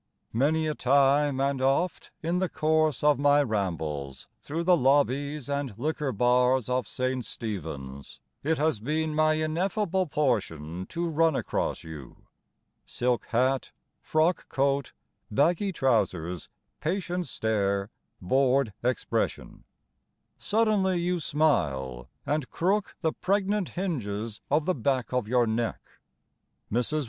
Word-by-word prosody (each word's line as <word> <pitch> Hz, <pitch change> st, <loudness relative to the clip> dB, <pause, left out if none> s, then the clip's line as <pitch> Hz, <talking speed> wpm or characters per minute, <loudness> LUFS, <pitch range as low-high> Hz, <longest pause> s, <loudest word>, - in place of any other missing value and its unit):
Many 155 Hz, +7 st, +2 dB
a 155 Hz, -, 0 dB
time 140 Hz, +1 st, +3 dB
and 135 Hz, -1 st, 0 dB
oft 140 Hz, +7 st, +1 dB
in 170 Hz, +3 st, 0 dB
the 185 Hz, -1 st, 0 dB
course 155 Hz, -1 st, +1 dB
of 150 Hz, -1 st, +4 dB
my 145 Hz, 0 st, +5 dB
rambles 80 Hz, -, -3 dB
Through 160 Hz, +4 st, -3 dB
the 180 Hz, +1 st, +5 dB
lobbies 140 Hz, 0 st, +1 dB
and 140 Hz, -6 st, -2 dB
liquor 150 Hz, +1 st, -1 dB
bars 125 Hz, +2 st, +2 dB
of 125 Hz, 0 st, 0 dB
St. 130 Hz, 0 st, -2 dB
Stephens 75 Hz, -, -6 dB, 0.2 s
It 160 Hz, +2 st, 0 dB
has 155 Hz, -6 st, +1 dB
been 155 Hz, +6 st, -1 dB
my 155 Hz, 0 st, +3 dB
ineffable 180 Hz, +4 st, 0 dB
portion 95 Hz, -, -1 dB
to 170 Hz, +1 st, -2 dB
run 165 Hz, -1 st, +2 dB
across -, -, -2 dB
you 75 Hz, -5 st, -11 dB, 0.6 s
Silk 125 Hz, -1 st, -1 dB
hat, 130 Hz, +3 st, +1 dB, 0.3 s
frock 160 Hz, +3 st, +1 dB
coat, 140 Hz, -1 st, 0 dB, 0.4 s
baggy 170 Hz, -, +2 dB
trousers, 95 Hz, -, 0 dB, 0.3 s
patient 180 Hz, +1 st, -2 dB
stare, 100 Hz, -2 st, -1 dB, 0.3 s
bored 130 Hz, +3 st, +2 dB
expression: 125 Hz, -1 st, -2 dB, 0.7 s
Suddenly 205 Hz, -4 st, +2 dB
you 175 Hz, +1 st, 0 dB
smile 70 Hz, -, 0 dB, 0.2 s
And 150 Hz, -3 st, -1 dB
crook 195 Hz, +4 st, 0 dB
the 160 Hz, -2 st, +1 dB
pregnant 200 Hz, 0 st, 0 dB
hinges 115 Hz, -, -3 dB
of 150 Hz, +2 st, +2 dB
the 185 Hz, -, +2 dB
back 130 Hz, -1 st, -1 dB
of 125 Hz, -4 st, 0 dB
your 125 Hz, +1 st, +3 dB
neck. 115 Hz, +1 st, -1 dB, 0.9 s
Mrs. 125 Hz, +7 st, +1 dB
140 Hz, 120 wpm, -27 LUFS, 115-160 Hz, 0.9 s, my